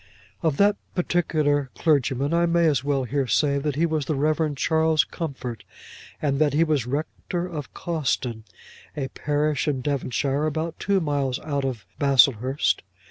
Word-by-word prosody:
Of 160 Hz, -5 st, +1 dB
that 205 Hz, 0 st, +4 dB, 0.2 s
particular 155 Hz, -6 st, +1 dB
clergyman, 140 Hz, -1 st, +1 dB
I 170 Hz, 0 st, +3 dB
may 170 Hz, 0 st, +3 dB
as 140 Hz, -6 st, +2 dB
well 140 Hz, -2 st, 0 dB
here 135 Hz, +1 st, -1 dB
say 140 Hz, +4 st, +2 dB
that 145 Hz, -1 st, -2 dB
he 160 Hz, +3 st, +2 dB
was 155 Hz, -3 st, -1 dB
the 155 Hz, -, 0 dB
Rev. 155 Hz, +1 st, +1 dB
Charles 160 Hz, 0 st, +2 dB
Comfort, 130 Hz, -, -6 dB, 0.6 s
and 140 Hz, -2 st, 0 dB
that 150 Hz, -3 st, +3 dB
he 155 Hz, +3 st, +4 dB
was 150 Hz, -7 st, 0 dB
rector 160 Hz, +5 st, -3 dB
of 155 Hz, -6 st, -6 dB
Cawston, 135 Hz, -8 st, -2 dB, 0.6 s
a 135 Hz, -2 st, -2 dB
parish 150 Hz, +2 st, -1 dB
in 135 Hz, -3 st, 0 dB
Devonshire, 140 Hz, +1 st, -1 dB
about 160 Hz, +2 st, -3 dB
two 195 Hz, -1 st, +1 dB
miles 140 Hz, -4 st, 0 dB
out 140 Hz, -3 st, -2 dB
of 125 Hz, -6 st, -4 dB
Baslehurst. 135 Hz, -1 st, +3 dB
145 Hz, 155 wpm, -24 LUFS, 135-160 Hz, 0.6 s, that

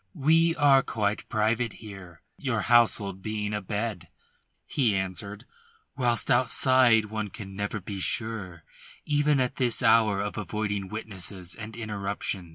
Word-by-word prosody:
"We 165 Hz, +4 st, +3 dB
are 140 Hz, -3 st, +5 dB
quite 105 Hz, -4 st, -2 dB
private 110 Hz, +1 st, 0 dB
here, 95 Hz, -7 st, -12 dB
your -, -, -2 dB
household 110 Hz, -5 st, +3 dB
being 105 Hz, 0 st, -3 dB
abed," 105 Hz, -2 st, -3 dB, 0.6 s
he 120 Hz, -8 st, +1 dB
answered, 95 Hz, +2 st, -4 dB, 0.5 s
"whilst 120 Hz, -5 st, +1 dB
outside 120 Hz, -2 st, +4 dB
one 110 Hz, 0 st, -4 dB
can 95 Hz, -2 st, -9 dB
never 100 Hz, +1 st, -3 dB
be 100 Hz, +1 st, -6 dB
sure 95 Hz, -5 st, -2 dB, 0.4 s
even 145 Hz, -1 st, +2 dB
at 125 Hz, -1 st, -1 dB
this 125 Hz, -1 st, +2 dB
hour 110 Hz, -3 st, +4 dB
of 105 Hz, +1 st, -3 dB
avoiding 105 Hz, 0 st, -3 dB
witnesses 95 Hz, -4 st, -5 dB
and 110 Hz, 0 st, -8 dB
interruption. 100 Hz, -5 st, -4 dB
110 Hz, 130 wpm, -27 LUFS, 100-120 Hz, 0.6 s, are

